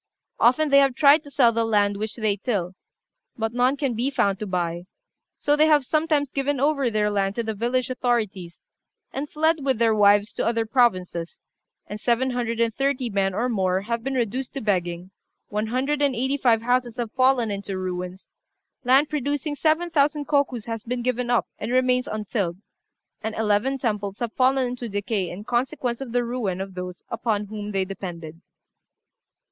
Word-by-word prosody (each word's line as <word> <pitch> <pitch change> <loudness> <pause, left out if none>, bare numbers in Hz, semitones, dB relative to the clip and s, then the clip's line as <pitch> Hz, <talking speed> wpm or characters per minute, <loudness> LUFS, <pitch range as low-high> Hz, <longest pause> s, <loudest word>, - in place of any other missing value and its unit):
Often 275 +6 +4
they 280 0 +7
have 275 -2 +3
tried 290 +2 +6
to - - -10
sell 250 -4 +4
the 230 0 0
land 205 -2 +2
which 215 +2 -4
they 215 -3 0
till, 195 -4 -2 0.6
but 225 0 -2
none 250 +3 +2
can 275 -3 -1
be 240 +4 0
found 200 -8 +1
to 215 - -4
buy; 175 -1 -2 0.5
so 290 - +2
they 305 +1 +4
have 295 -3 +4
sometimes 305 -2 +1
given 275 0 -1
over 280 -2 +2
their 210 -1 +1
land 200 -1 0
to 235 - -1
the 220 0 -3
village 240 +4 0
authorities, 220 -9 -2 0.6
and 285 +2 -4
fled 315 -1 +1
with 265 -3 +1
their 230 -1 +3
wives 205 +1 +4
to - - -2
other 230 -1 +1
provinces, 185 -8 0 0.5
and 210 - -7
seven 245 +3 +1
hundred 235 -2 -2
and 230 -1 +2
thirty 270 -2 -1
men 195 -1 0
or 235 +4 0
more 190 -5 0
have 230 +2 -3
been 270 +1 -2
reduced 250 +2 -2
to - - -2
begging, 180 -3 -1 0.4
one 210 +1 -2
hundred 270 +5 -1
and 280 -3 +2
eighty 265 +4 0
five 235 -5 +2
houses 245 -1 0
have 235 -3 -3
fallen 255 -3 +2
into 200 -1 -4
ruins; 180 0 -5 0.5
land 265 +4 +5
producing 290 0 -2
seven 320 +4 +1
thousand 295 -1 +2
kokus 280 -6 0
has 225 -1 -4
been 245 +2 -4
given 250 0 -1
up, 245 - +2
and - - -4
remains 255 0 +2
untilled, 205 -4 -2 0.6
and 220 0 -4
eleven 220 +5 +1
temples 210 -5 -2
have 235 -2 -4
fallen 260 0 +2
into 245 -1 -5
decay 200 -2 -2
in 190 +4 -7
consequence 245 +1 -1
of 265 -3 -6
the 245 0 +1
ruin 230 -7 -2
of 195 0 -5
those 180 0 -7
upon 220 -3 -1
whom 210 0 -6
they 195 -1 0
depended. 170 -4 -7
235 Hz, 185 wpm, -24 LUFS, 205-265 Hz, 0.6 s, they